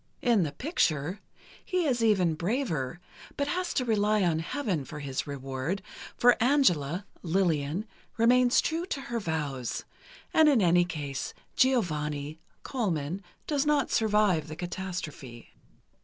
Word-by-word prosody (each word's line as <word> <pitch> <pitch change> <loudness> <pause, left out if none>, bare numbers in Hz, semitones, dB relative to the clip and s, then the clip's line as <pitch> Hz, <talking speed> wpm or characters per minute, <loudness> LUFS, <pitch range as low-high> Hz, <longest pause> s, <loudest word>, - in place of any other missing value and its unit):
In 235 -5 +4
the 155 -4 0
picture, 175 - 0 0.4
he 365 -2 0
is 245 -5 +1
even 190 -7 +3
braver, 170 - -2 0.4
but 285 - 0
has 360 0 -1
to 255 - +1
rely 215 -2 +2
on 165 -3 +2
Heaven 185 - -2
for 150 - -9
his 140 0 -3
reward, 135 +6 -3 0.3
for 245 -1 +5
Angela 185 - +2 0.2
(Lillian) 170 0 0 0.3
remains 245 +2 +5
true 335 +2 -2
to 280 - -3
her 235 -3 -3
vows, 150 - -3 0.5
and 315 -1 +6
in 275 -5 +4
any 175 -2 +4
case, 145 -6 -5 0.2
Giovanni 150 - +1 0.2
(Colman) 185 - -2 0.2
does 290 -3 +1
not 295 -3 +2
survive 210 -8 +2
the 155 - -7
catastrophe. 175 -9 -6
185 Hz, 130 wpm, -28 LUFS, 150-245 Hz, 0.5 s, and